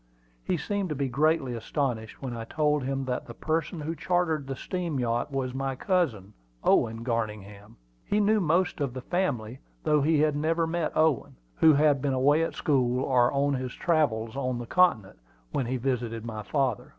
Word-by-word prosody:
He - - 0
seemed 200 -3 -2
to 150 - -2
be 140 0 -1
greatly 145 0 +1
astonished 115 -1 -3
when 125 -3 -4
I 115 - -5
told 150 +4 +1
him 135 +1 -2
that 125 -1 -3
the 120 - -9
person 160 +3 -2
who 160 +2 -3
chartered 165 -4 0
the 135 - -3
steam 170 -1 -3
yacht 120 +3 -1
was 130 -2 -2
my 135 0 -2
cousin, 130 - -1 0.3
Owen 115 +1 +2
Garningham. 105 -3 -4 0.3
He 205 - 0
knew 210 +1 +3
most 175 -1 +1
of 135 -3 -2
the 130 - -4
family, 130 - -2 0.2
though 150 -1 +3
he 155 +1 +3
had 150 -1 +2
never 165 +3 +1
met 165 -1 -2
Owen, 150 - +2 0.2
who 160 -1 +6
had 145 -2 +3
been 140 -1 0
away 145 +4 +3
at 165 - -2
school, 130 -5 +1
or 125 -2 +3
on 140 +1 +1
his 130 -1 -3
travels 125 -9 0
on 130 -2 -1
the 120 - -5
Continent, 115 - +2 0.3
when 130 - -1
he 130 +1 -1
visited 120 -3 -2
my 110 -2 -5
father. 130 -2 -1
135 Hz, 185 wpm, -27 LUFS, 120-155 Hz, 0.3 s, who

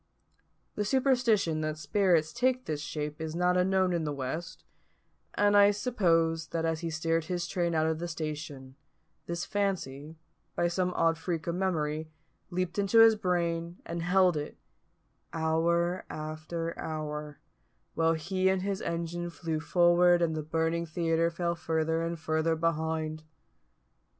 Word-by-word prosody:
The 210 - -1
superstition 230 - +2
that 155 0 -2
spirits 160 +1 +2
take 255 +1 +1
this 150 -2 -3
shape 150 +1 -5
is 160 0 -4
not 180 +1 +2
unknown 185 0 +2
in 170 -2 0
the 150 - -2
West; 145 +5 -5 0.7
and 205 0 +3
I 205 0 +7
suppose 165 -7 +1
that 165 -1 -2
as 165 -1 0
he 165 0 -3
steered 165 0 0
his 175 0 -2
train 170 -2 -1
out 155 0 +2
of 160 0 0
the 175 - -3
station, 150 -4 -6 0.5
this 170 +1 -3
fancy, 165 -8 -2 0.4
by 175 - +1
some 180 +1 0
odd 165 0 +2
freak 165 -1 -3
of 170 - -1
memory, 160 -4 -1 0.4
leaped 180 +1 -2
into 200 +3 +2
his 225 0 +8
brain, 170 -3 -1
and 170 0 -4
held 180 0 +3
it, 150 0 -5 0.8
hour 170 +2 +1
after 155 +2 -5
hour, 150 -1 -5 0.5
while 165 0 +2
he 185 +4 0
and 190 -1 0
his 200 0 -2
engine 170 +1 -3
flew 160 -1 -3
forward 175 +2 +4
and 160 -1 0
the 155 - -2
burning 165 +2 -1
theatre 165 +1 +1
fell 170 0 -1
further 160 -1 -1
and 165 0 -3
further 160 +1 0
behind. 160 -1 -1
165 Hz, 150 wpm, -29 LUFS, 160-180 Hz, 0.8 s, his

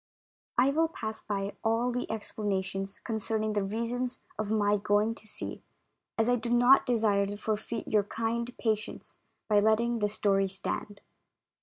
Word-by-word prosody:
I 255 +3 +5
WILL 325 +3 +3
pass 220 -8 -5
by 200 -1 -3
all 230 +2 +2
the 245 +1 -3
explanations 195 -2 -3
concern 220 -1 -2
ing 215 0 0
the 205 - +1
reasons 235 +5 -2 0.2
of 215 -1 -1
my 210 -1 +3
going 210 +2 +2
to 220 -1 -14
sea, - - -5 0.6
as 225 0 +2
I 245 0 +4
do 235 0 -4
not 245 +3 +6
desire 215 -5 +2
to 205 +1 -5
forfeit 220 +2 -3
your 210 -2 +2
kind 230 +3 -2
patience 215 -2 -3 0.3
by 210 -1 +5
letting 230 +3 +2
this 210 -1 0
story 195 -1 +2
stand. 200 +1 -5
220 Hz, 160 wpm, -30 LUFS, 205-235 Hz, 0.6 s, not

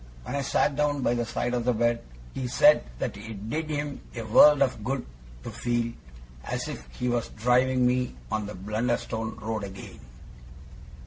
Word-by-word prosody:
When 135 - -4
I 140 - 0
sat 140 +1 +1
down 145 -1 +1
by 120 - +2
the 120 -1 -1
side 120 +1 -2
of 120 -1 0
the 125 0 +2
bed, 120 +1 +1 0.3
he 130 - -3
said 120 - +5
that - - -3
it 105 0 -7
did 155 +2 -2
him 145 -2 -3
a 115 - -4
world 140 +6 +7
of 125 -5 -2
good 130 +2 -2 0.4
to - - -6
feel 120 -1 -1 0.5
as - - -3
if - - -7
he 125 - -2
was 120 -1 0
driving 125 +2 +2
me 125 - +1 0.2
on 105 -1 -1
the 105 - -7
Blunderstone 110 +2 -2
road 110 -1 -4
again. 95 -1 -9
120 Hz, 180 wpm, -27 LUFS, 110-130 Hz, 0.5 s, world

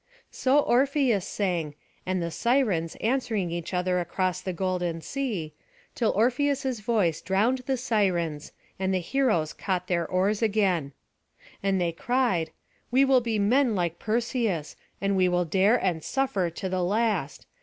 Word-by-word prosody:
So 265 +2 +2
Orpheus 260 -6 +2
sang, 170 -7 -2 0.3
and 185 0 0
the 170 - -3
Sirens, 210 - +1
answering 225 -7 0
each 170 0 -4
other 180 0 0
across 185 +1 -1
the 185 - -3
golden 180 -2 -2
sea, 205 - -3 0.4
till 230 -3 +1
Orpheus's 260 +2 +1
voice 205 -7 0
drowned 210 +8 +1
the 265 -1 +1
Sirens, 180 -11 0 0.3
and 190 0 0
the 190 - +2
heroes 180 - 0
caught 185 -3 -2
their 170 -2 0
oars 195 +4 +1
again. 195 -10 +1 0.7
And 195 -1 +1
they 175 -1 +1
cried: 190 -3 0 0.4
"We 265 +3 +4
will 265 -2 +4
be 230 -2 -1
men 235 +3 +3
like 175 -2 -1
Perseus, 225 - -1 0.2
and 200 0 0
we 185 -1 +3
will 180 0 +1
dare 195 +7 +3
and 175 -8 -1
suffer 230 -10 0
to 190 +4 -5
the 185 0 -1
last. 200 -6 -1
195 Hz, 150 wpm, -26 LUFS, 175-240 Hz, 0.7 s, We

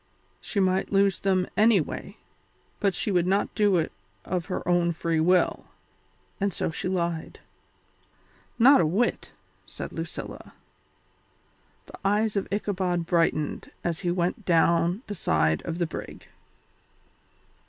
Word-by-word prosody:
She 205 - -3
might 190 0 +1
lose 195 -1 +3
them 185 -2 +1
anyway, 210 -6 +1 0.6
but 195 -3 +1
she 210 - -1
would 180 -2 +2
not 195 +2 +1
do 205 -3 +3
it 160 - -1 0.3
of 180 -2 -2
her 180 - -4
own 175 -1 +2
free 165 0 -1
will, 180 +3 +2 0.7
and 200 0 0
so 165 - -2
she 170 - -4
lied. 170 -3 -2 1.2
"Not 250 0 +7
a - - +2
whit!" 210 +10 0 0.4
said - - -7
Lucilla. - - -7 1.3
The - - -13
eyes 210 +2 +1
of 200 - -2
Ichabod 185 -4 -1
brightened 165 -3 0
as 170 -2 -2
he 180 - -2
went 180 +4 -1
down 170 +3 +2
the 210 - -5
side 80 - +1
of 165 0 -3
the 175 - +1
brig. 160 - -8
180 Hz, 130 wpm, -26 LUFS, 170-200 Hz, 1.3 s, Not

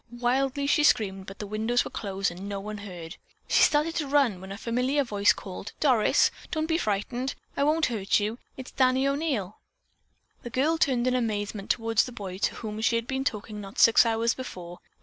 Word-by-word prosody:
Wildly 265 +3 +1
she 295 +2 +3
screamed, 195 -9 +2
but 195 - -9
the 210 - -5
windows 220 +4 0
were - - -7
closed 195 -2 -2
and 190 +4 -8
no 200 -1 -3
one 210 +1 -6
heard. 175 -5 -9 0.3
She - - +3
started 300 +2 +3
to 305 -4 -1
run, 270 -10 +2
when 190 +1 -9
a 195 - -6
familiar 250 +6 0
voice 205 -5 +3
called, 190 +1 -7
"Doris, 250 -8 +3 0.2
don't 315 0 -1
be 325 +1 0
frightened. 240 - -2 0.2
I - - +1
won't 310 +2 +3
hurt 210 -5 +1
you. 215 +4 -3 0.2
It's 260 -1 -8
Danny 260 +1 +2
O'Neil." 275 - -2 0.8
The 240 - -7
girl 295 +7 +1
turned 250 -5 +2
in 255 - +2
amazement 210 -4 -2
toward 225 -1 0
the 250 - +3
boy 195 -5 -7
to - - 0
whom 215 -1 -6
she 230 - +2
had 230 0 -1
been 265 +1 -2
talking 215 -4 -4
not 195 +4 -10
six 230 - +7
hours 230 0 +1
before. 180 -9 -8
230 Hz, 200 wpm, -27 LUFS, 205-265 Hz, 0.8 s, six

